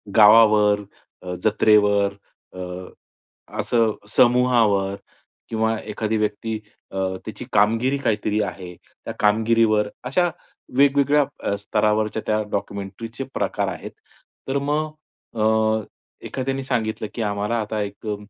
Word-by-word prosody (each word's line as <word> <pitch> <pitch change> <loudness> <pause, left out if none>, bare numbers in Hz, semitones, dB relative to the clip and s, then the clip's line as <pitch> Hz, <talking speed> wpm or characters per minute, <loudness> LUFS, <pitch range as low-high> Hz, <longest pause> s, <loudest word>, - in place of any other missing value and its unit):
गावावर, 105 -1 +6 0.4
अ, 90 0 -5
जत्रेवर, 105 -2 +3 0.4
अ, 90 - -8 1.0
असं 115 -2 +2 0.2
समूहावर 115 -6 +3 0.5
किंवा 110 0 0
एखादी 110 +1 -2
व्यक्ती 105 +1 -2 0.3
अ, 95 - -6 0.3
त्याची 110 +3 -7
कामगिरी 115 +7 +3
काहीतरी 105 -3 0
आहे, 90 -3 -7
त्या - - -11
कामगिरीवर, 110 0 +3
अशा 175 +8 +1 0.5
वेगवेगळ्या 140 +1 +4 0.2
अ, 100 - 0
स्तरावरच्या 105 +1 0
त्या 110 0 +2
डॉक्युमेंटरीचे 100 +5 -5
प्रकार - - -1
आहेत. - - -7 0.6
तर 135 +1 0
मग 150 +2 -1 0.4
अ, 110 - 0 0.8
एखाद्याने 135 0 -3
सांगितलं, 110 -4 -2
की 115 - -3
आम्हाला 105 +2 -1
आता 105 0 -3
एक 100 +2 -6
अ, 105 - -1
110 Hz, 110 wpm, -22 LUFS, 105-120 Hz, 1.0 s, गावावर